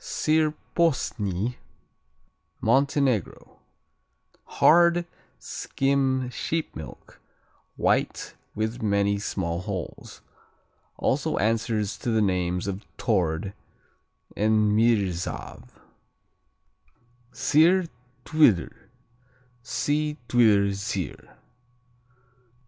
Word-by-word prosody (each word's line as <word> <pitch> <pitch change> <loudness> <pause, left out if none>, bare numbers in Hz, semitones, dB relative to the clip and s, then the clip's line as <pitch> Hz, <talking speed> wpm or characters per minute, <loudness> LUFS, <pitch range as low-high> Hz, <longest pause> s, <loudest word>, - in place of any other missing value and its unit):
Sir 155 0 +1 0.2
Posny 120 - 0 1.0
Montenegro 135 - 0 0.9
Hard; 170 +1 +4 0.3
skim 135 -2 -1
sheep 160 +5 -3
milk; - - -11 0.5
white, - - 0 0.2
with 110 +3 -2
many 100 -1 +1
small 85 -5 -3
holes. 95 -3 -7 0.8
Also - - 0
answers 110 -1 0
to - - -3
the 110 -1 +2
names 90 -3 0
of 100 +1 -4
Tord 95 -3 0 0.8
and 110 0 +2
Mrsav. 105 -6 0 1.6
Sir, 170 +4 +3 0.4
Twdr 150 - +3 0.9
see 150 +4 -1
Twdr 105 -5 +4
Sir. 95 -3 -5
110 Hz, 70 wpm, -25 LUFS, 100-140 Hz, 1.6 s, Hard